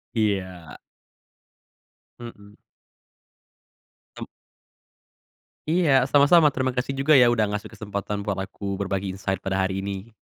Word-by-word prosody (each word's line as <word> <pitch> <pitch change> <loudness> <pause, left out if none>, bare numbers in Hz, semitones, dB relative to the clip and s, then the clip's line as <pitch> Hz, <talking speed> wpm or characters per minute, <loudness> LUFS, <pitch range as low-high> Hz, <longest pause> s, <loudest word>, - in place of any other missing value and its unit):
Iya. 95 -6 -2 1.4
Mhm. 105 -3 -12 1.6
M - - -6 1.4
Iya, 155 -6 +3
sama-sama, 150 +2 +5
terimakasih 130 0 -2
juga 150 +2 +4
ya 120 -2 +6
udah 110 -3 +1
ngasih 105 0 -5
kesempatan 100 -1 -5
buat 100 -1 -3
aku 100 0 -6
berbagi 100 0 -3
insight 95 -1 -3
pada 95 0 -1
hari 95 +1 -2
ini. 100 +3 -6
105 Hz, 105 wpm, -24 LUFS, 95-130 Hz, 1.6 s, ya